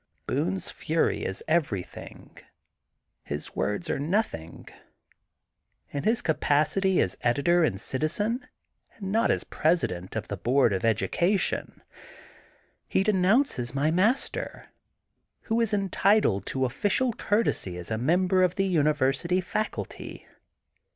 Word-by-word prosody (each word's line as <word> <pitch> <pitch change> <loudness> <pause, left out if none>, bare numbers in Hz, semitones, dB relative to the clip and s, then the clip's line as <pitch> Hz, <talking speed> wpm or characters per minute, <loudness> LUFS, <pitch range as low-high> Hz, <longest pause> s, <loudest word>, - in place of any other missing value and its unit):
Boone 95 +1 -1
's - - -6
fury - - 0
is 95 - -3
everything. 145 - -3 0.9
His 75 +1 -6
words 105 +12 -1
are - - -1
nothing. 150 - -2 1.2
In 140 -1 -4
his 230 +2 +2
capacity 160 +5 +2
as 90 - 0
editor 145 +8 +3
and 95 -11 0
citizen, 205 - -2 0.5
and 195 -3 -5
not 225 +2 +2
as - - +1
President 110 - -1
of 110 - -3
the 100 - -4
Board 120 +2 +2
of 95 - -1
Educa 170 - +1
tion, - - -3 1.0
he 190 - +1
denounces 190 - +2
my 145 +3 +2
master, 210 +10 0 0.7
who 230 +1 0
is 225 -2 +1
entitled 195 - +2
to 130 -1 0
official 210 - +1
courtesy 205 - 0
as 90 +4 -8
a 110 - 0
member 180 +7 +2
of 180 -1 +2
the 195 - +1
Uni 155 -5 +3
versity 150 +6 +1
faculty. 215 +4 -4
165 Hz, 125 wpm, -27 LUFS, 120-195 Hz, 1.2 s, editor